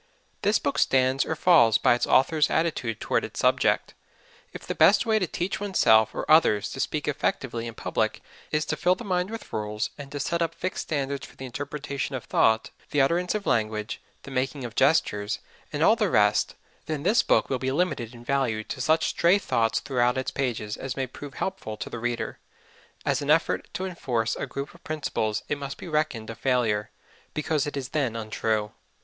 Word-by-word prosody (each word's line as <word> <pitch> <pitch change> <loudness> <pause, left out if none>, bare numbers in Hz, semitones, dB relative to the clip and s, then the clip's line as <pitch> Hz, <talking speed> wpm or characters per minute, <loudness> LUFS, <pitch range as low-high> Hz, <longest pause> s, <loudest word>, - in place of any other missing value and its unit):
This 205 +2 +3
book 140 - -1
stands 130 0 +3
or 160 - -1
falls 155 - +5
by - - +4
its 120 - 0
authors' 150 +3 +4
attitude 155 -9 0
toward - - 0
its - - -6
subject. - - +2 0.6
If - - -9
the - - -2
best 210 - +5
way 220 -1 +3
to 185 - 0
teach 175 +4 -3
oneself 110 - +4
or - - -3
others 130 -10 +4
to - - -7
speak 150 +2 -2
effectively 120 -4 -1
in 115 - -7
public - - -1 0.3
is 155 0 +1
to - - -1
fill 180 +1 +2
the 215 - -9
mind 180 -2 0
with 225 0 -8
rules, 105 0 -2
and 140 -1 -8
to 145 - -4
set 170 +4 -1
up 165 - -1
fixed 185 - -3
standards 140 -2 -3
for - - -18
the 135 - -7
interpretation 140 +1 -4
of 130 - -5
thought, 110 0 +2 0.2
the 145 - 0
utterance 175 +8 +2
of 210 -2 -3
language, 110 -1 -1 0.2
the 140 - -9
making 130 +1 -2
of 115 - -6
gestures, 105 -7 +2 0.3
and - - 0
all - - +6
the - - +1
rest, - - +3 0.3
then 155 -2 -3
this 205 +7 +4
book - - +2
will 130 - -1
be 130 0 -1
limited 140 -7 -1
in 120 - -12
value 120 -5 0
to 130 - -6
such 160 +4 +3
stray 170 +3 +4
ideas 115 - +1
throughout 125 -2 +1
its 130 - -2
pages 115 -6 -2
as 135 0 -5
may 135 - 0
prove 135 +2 -10
helpful 185 - -4
to 120 - -6
the 120 - -5
reader 115 -1 -3 0.7
as - - +1
an - - -4
effort - - +2
to 185 - -3
enforce 120 -11 -1
a - - -4
group 140 +1 -6
of 170 - -19
principles 140 -8 -2
it 145 - -2
must 140 -1 -5
be - - -9
reckoned 150 -8 -1
a - - -5
failure, 115 -3 0 0.5
because 150 -1 0
it 145 - -4
is 130 -2 -4
then 135 -7 -1
untrue. 110 -1 -1
135 Hz, 205 wpm, -26 LUFS, 115-155 Hz, 0.7 s, all